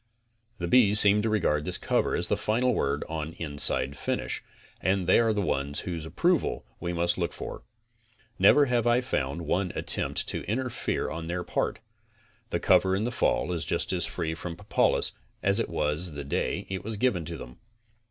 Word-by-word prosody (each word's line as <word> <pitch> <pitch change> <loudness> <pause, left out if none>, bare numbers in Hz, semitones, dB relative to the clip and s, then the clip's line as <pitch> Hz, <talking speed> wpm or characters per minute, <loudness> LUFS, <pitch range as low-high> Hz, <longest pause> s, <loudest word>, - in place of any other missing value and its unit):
The 85 - -3
bees 105 -1 +5
seem 105 0 +6
to 110 - 0
regard 80 -8 +1
this 90 +1 -2
cover - - 0
as - - 0
the - - 0
final 125 +4 +1
word 70 -6 -1
on 80 0 -5
inside 70 -4 +2
finish, - - -3 0.4
and 95 +1 +1
they 90 - +5
are 115 -1 +3
the 105 -2 -1
ones 70 -3 -1
whose 85 -3 -5
approval 175 - 0
we 85 - -3
must 85 +1 +1
look 85 -2 -1
for. - - -7 0.8
Never 140 +10 +6
have 120 -2 +1
I 120 +1 +3
found 75 - -2
one 90 +3 0
attempt - - +2
to - - -1
intrefere 125 +3 -2
on 80 0 -6
their 90 +1 -3
part. - - -2 0.7
The - - -1
cover 95 0 +3
in 100 - -1
the 120 - -1
fall 90 - 0
is 85 -3 -1
just - - 0
as - - +1
free 80 -2 -3
from 85 +1 -6
propolis - - +1 0.3
as 100 +3 +2
it - - -1
was 75 +3 -1
the 70 0 -6
day 70 - -2
it 95 -2 -5
was 110 0 -4
given 100 -7 +1
to 85 +1 -6
them. 60 0 -11
90 Hz, 190 wpm, -27 LUFS, 80-110 Hz, 0.8 s, seem